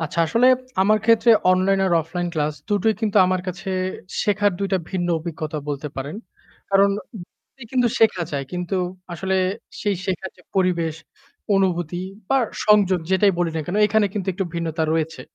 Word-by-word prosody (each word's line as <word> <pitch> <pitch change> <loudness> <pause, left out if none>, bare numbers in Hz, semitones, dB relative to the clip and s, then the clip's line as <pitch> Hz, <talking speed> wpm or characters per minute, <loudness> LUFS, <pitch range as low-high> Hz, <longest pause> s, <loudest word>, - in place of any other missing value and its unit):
আচ্ছা, 160 +1 -4
আসলে 230 +10 +3 0.4
আমার 215 +2 +4
ক্ষেত্রে 230 +1 +5 0.2
অনলাইন 185 +1 +3
আর 180 - 0
অফলাইন 175 +2 -4
ক্লাস 150 -1 0
দুটোই 210 +1 +2
কিন্তু 215 -2 -1
আমার 185 0 0
কাছে, 180 +1 -5 0.5
শেখার 205 0 +2
২ 200 0 -1
টা 190 - +3
ভিন্ন 175 -2 -1
অভিজ্ঞতা 155 -2 -5
বলতে 145 +1 -3
পারেন। 140 +6 -5 0.5
কারণ 195 0 +5 0.2
উ - - -7 0.5
কিন্তু 250 -2 +3
শেখা 215 -5 +3
যায় 140 -1 -2
কিন্তু 180 +1 -3 0.4
আসলে 190 +3 -2 0.5
সেই 205 -2 0
শেখার 190 0 -3
যে 180 - -20
পরিবেশ, 170 -4 +1 0.6
অনুভূতি 175 -3 0 0.3
বা 270 - +3 0.3
সংযোগ, 205 -3 +5
যেটাই 195 +1 +4
বলি 175 -1 +1
না - - 0
কেন 180 - -2
এখানে 210 0 +2
কিন্তু 195 -3 -3
একটু 190 +2 -2
ভিন্নতা 165 -1 -2
রয়েছে। 160 0 -1
185 Hz, 165 wpm, -22 LUFS, 170-205 Hz, 0.6 s, ক্ষেত্রে